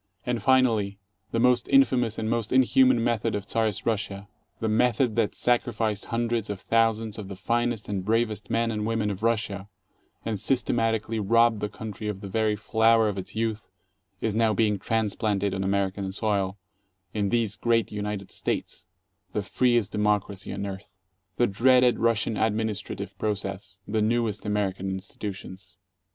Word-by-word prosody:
And, 125 -3 -1
finally, 115 -5 +3 0.3
the 115 - -1
most 125 +1 +3
infamous 125 - +4
and 110 - -2
most 115 -1 -1
inhuman 130 -1 +4
method 115 -4 0
of 100 -1 -3
Czarist 110 -3 -1
Russia, 100 -3 -2 0.3
the 110 - -1
method 120 +1 +2
that 115 -3 +1
sacrificed 110 -4 0
hundreds 115 -2 -1
of 100 -2 -4
thousands 115 -1 +1
of 100 - -6
the 95 - -7
finest 120 +3 -1
and 100 -2 -2
bravest 110 0 0
men 115 0 +1
and 105 -1 -2
women 110 -2 0
of 100 0 -6
Russia, 105 -3 -1 0.6
and 110 -3 -2
systemat 115 -2 +1
ically 110 0 -4
robbed 115 +1 +4
the 105 - -2
country 105 -1 -7
of 100 -2 -4
the 100 - -6
very 110 +2 +1
flower 110 +1 +3
of 100 -1 -3
its 95 - -8
youth, 110 -1 -2 0.5
is 110 - 0
now 110 -1 +2
being 105 -3 +2
transplanted 105 -2 0
on 95 0 -2
American 95 0 -1
soil, 100 -2 -1 0.6
in 105 -2 0
these 115 -2 0
great 115 0 +1
United 105 -2 -4
States, - - -4 0.5
the 105 - -1
freest 120 0 +1
democracy 105 -2 -1
on 100 0 -4
earth. 95 0 -7 0.5
The 120 - +4
dreaded 125 +4 +4
Russian 115 -1 +1
administra 110 -1 -1
tive - - -7
process 100 -2 -3
the 110 +1 0
newest 110 -1 0
American 95 -2 -1
institutions! 95 -1 -7
110 Hz, 160 wpm, -26 LUFS, 100-115 Hz, 0.6 s, infamous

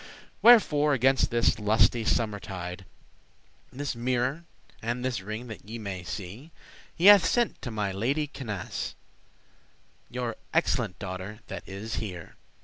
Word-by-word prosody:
Wherefore, 150 -11 +6
against 135 +2 +3
this 120 -1 +2
lusty 110 +2 +3
summer 110 -2 0
tide, 95 -1 -7 0.9
This 140 0 -4
mirror, 125 +6 -1 0.4
and 120 +2 -2
this 120 -6 -1
ring 110 +5 -6
that 105 -2 -10
ye 115 - -5
may 100 -4 -5
see, 100 - -7 0.5
He 170 - -1
hath 205 -2 +10
sent 240 -1 +1
to 125 - -5
my 105 -3 -2
lady 130 +10 0
Canace, 110 -10 -5 1.1
Your 120 -2 -4 0.2
excellente 90 - +1
daughter 95 +3 -6
that - - -5
is 100 +4 -5
here. 95 -6 -6
115 Hz, 135 wpm, -28 LUFS, 100-130 Hz, 1.1 s, hath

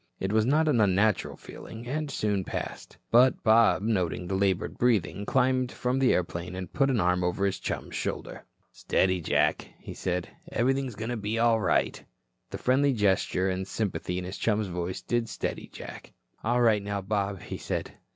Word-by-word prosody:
It 95 +2 -2
was 110 0 +3
a - - -2
not 155 +4 +3
unnatural 105 -5 +2
feeling, 115 +2 -10
and 150 +3 -2
soon 105 -7 0
passed, - - -6
but 125 +2 +5
Bob 110 -3 +5
noting 90 -5 0
the 90 - -3
labored 95 -1 0
breathing 105 -4 +1
climbed 130 -1 +2
from 125 +1 -1
the 130 -2 +4
airplane 90 0 -2
and 95 -2 -6
put 135 -1 +2
an 125 -4 +2
arm 90 0 +2
over 90 +3 0
his 95 -1 -1
chum's - - -4
shoulder. - - -4 0.3
"Steady, 95 -1 +1
Jack," - - +1
he - - -9
said. 90 -1 -2 0.2
"Everything's 130 0 0
going 110 +3 -4
to 120 - -2
be 105 +1 -2
all 115 -1 +4
right." 95 -4 +1 0.5
The - - -5
friendly 135 +2 +2
gesture 95 -3 +1
and 95 0 -1
the 95 - -11
sympathy 95 -4 -2
in 90 - -3
his 95 +3 -6
chum's 110 -1 +1
voice 90 -1 -4
did 120 -1 -1
steady - - -4
Jack. - - -10 0.3
"All 120 +2 +2
right, 110 -3 +4
now, 100 0 -3
Bob," 100 -1 -1
he - - -6
said. - - -3
105 Hz, 185 wpm, -28 LUFS, 95-120 Hz, 0.5 s, but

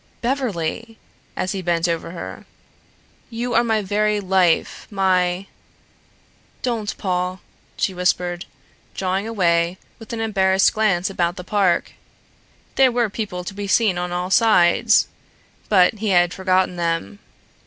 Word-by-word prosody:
"Beverly," 230 - -2 0.4
as 185 - -2
he 195 - -3
bent 170 -1 0
over 165 -1 -2
her, 170 0 -8 0.8
"you 240 +1 -3
are 235 - +4
my 220 -2 0
very 210 +1 +1
life, 185 -3 +1
my 185 -2 +1 0.5
" - - -35
"Don't, 230 -4 -2
Paul!" 180 0 -2 0.4
she 190 - 0
whispered, 180 -1 -1 0.5
drawing 190 +2 -1
away 175 -4 +1 0.2
with 225 - -11
an 230 - -4
embarrassed 190 -3 +2
glance 195 -4 +1
about 175 -2 -1
the 180 - -7
park. 190 -2 +1 0.9
There 265 -2 +5
were 235 -3 0
people 200 -5 -4
to 185 - -6
be 200 0 -5
seen 195 -3 +2
on 180 0 -3
all 180 +1 -3
sides. 195 -6 +4 0.6
But 185 -4 +5
he 220 - -2
had 175 -1 +3
forgotten 185 -1 +1
them. 165 - -2
190 Hz, 135 wpm, -21 LUFS, 180-215 Hz, 0.9 s, There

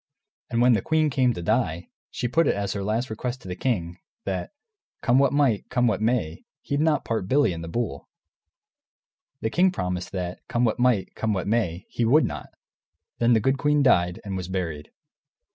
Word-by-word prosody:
And 115 +1 +1
when 125 0 +6
the 105 - +2
queen 155 +2 +1
came 130 -2 +3
to 85 - -5
die, 95 -6 0 0.2
she 125 - -3
put 165 +7 +2
it - - +2
as 100 -1 -2
her 100 - -3
last 110 +4 -1
request 125 +3 -4
to - - -10
the 90 - -4
king, 90 -6 -2 0.3
that - - -3 0.5
come 125 +1 +4
what 140 - +4
might, 140 -7 +1
come 125 -1 +1
what 105 -4 +1
may, 110 -9 0 0.2
he'd 140 - -1
not 155 0 +2
part 110 -5 -2
Billy 140 -4 +3
and 85 0 -6
the - - -6
bull. 90 -6 -4 1.3
And - - -53
the 110 - -1
king 185 +2 +4
promised 90 - -3
that, 90 -1 -4
come 120 +1 +1
what 115 +1 0
might, 120 -6 +2
come 110 -1 -1
what 95 -3 -2
may, 100 -5 -1
he 120 - -2
would 140 +8 +5
not. - - -6 0.7
Then 120 0 +4
the 115 - +4
good 135 +5 +1
queen 150 0 +3
died, 90 -8 +3
and 100 -1 -4
was 90 -2 -4
buried. 85 -6 -4
110 Hz, 205 wpm, -25 LUFS, 90-130 Hz, 1.3 s, when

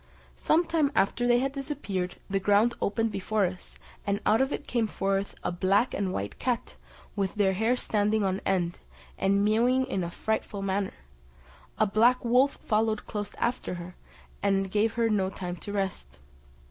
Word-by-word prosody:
Some 335 +3 +3
time 310 -4 +1
after 240 +5 +2
they 240 0 +5
had 270 +2 0
disappeared, 260 -11 -3
the 195 0 0
ground 205 +4 +3
opened 225 +2 0
before 200 +1 0
us, 180 0 -6 0.3
and 200 0 0
out 220 +4 +4
of 265 +1 +1
it - - -4
came 235 -3 0
forth 195 -1 -1
a - - -1
black 195 +7 +2
and 195 -2 -1
white 100 - -4
cat, 245 -2 -2 0.4
with 195 -3 -1
her 200 -2 +3
hair 220 +6 +2
standing 210 -2 +1
on 190 0 0
end, 175 -3 0 0.4
and 200 +1 +2
mewing 245 +5 +3
in 195 -8 -2
a 170 - -3
frightful 205 +1 -3
manner; 195 0 -1 0.8
a 215 - +4
black 235 +5 +3
wolf 255 +4 +4
followed 215 0 +1
close 205 -1 -5
after 240 -6 -2
her, 175 +1 -8 0.5
and 195 -1 +1
gave 215 +2 +2
her 230 -1 +2
no 200 -4 +1
time 180 -2 -5
to 205 - -7
rest. 195 -2 -3
205 Hz, 170 wpm, -28 LUFS, 195-235 Hz, 0.8 s, they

